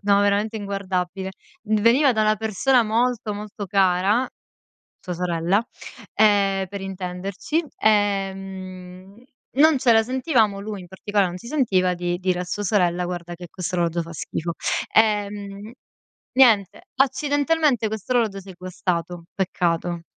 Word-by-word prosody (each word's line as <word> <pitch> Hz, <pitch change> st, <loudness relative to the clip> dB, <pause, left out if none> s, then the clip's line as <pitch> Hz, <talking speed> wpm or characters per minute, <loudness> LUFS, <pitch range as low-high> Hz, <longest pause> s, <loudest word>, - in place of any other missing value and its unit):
no, 200 Hz, 0 st, +4 dB
veramente 205 Hz, +2 st, +1 dB
inguardabile. 190 Hz, -2 st, -3 dB, 0.3 s
D 215 Hz, 0 st, 0 dB
veniva 255 Hz, +5 st, +5 dB
da 220 Hz, -, 0 dB
una 215 Hz, 0 st, +3 dB
persona 225 Hz, +4 st, +2 dB
molto, 225 Hz, -1 st, 0 dB
molto 205 Hz, 0 st, -7 dB
cara, 195 Hz, +5 st, +2 dB, 0.7 s
sua 180 Hz, -, -6 dB
sorella, 175 Hz, +3 st, 0 dB, 0.5 s
ehm, 200 Hz, -2 st, +3 dB
per 200 Hz, +1 st, -6 dB
intenderci, 195 Hz, -, -3 dB
ehm 195 Hz, -1 st, -2 dB, 0.3 s
non 300 Hz, 0 st, +5 dB
ce 250 Hz, -, +3 dB
la 225 Hz, 0 st, +4 dB
sentivamo, 245 Hz, -5 st, +1 dB
lui 205 Hz, -1 st, -5 dB
in -, -, -12 dB
particola 195 Hz, +2 st, 0 dB
non 175 Hz, -, -5 dB
si 210 Hz, +6 st, -10 dB
sentiva 190 Hz, -11 st, +1 dB
di 175 Hz, 0 st, -2 dB
dire 185 Hz, -1 st, 0 dB
a 180 Hz, -, -2 dB
sua 200 Hz, +3 st, -4 dB
sorella 180 Hz, -3 st, +1 dB
guarda 175 Hz, -1 st, -5 dB
che 175 Hz, 0 st, -10 dB
questo 180 Hz, -1 st, -4 dB
orologio 170 Hz, -1 st, 0 dB
fa 165 Hz, 0 st, -10 dB
schifo. 165 Hz, +1 st, -4 dB, 0.4 s
Ehm, 205 Hz, -1 st, 0 dB, 0.6 s
niente, 220 Hz, -8 st, +4 dB
accidentalmente 285 Hz, -1 st, +2 dB
questo 220 Hz, +3 st, -4 dB
orologio 225 Hz, -5 st, +1 dB
si 195 Hz, 0 st, -12 dB
è 185 Hz, -, -11 dB
guastato, 175 Hz, -1 st, -3 dB
peccato. 175 Hz, -2 st, -1 dB
200 Hz, 140 wpm, -23 LUFS, 180-220 Hz, 0.7 s, veniva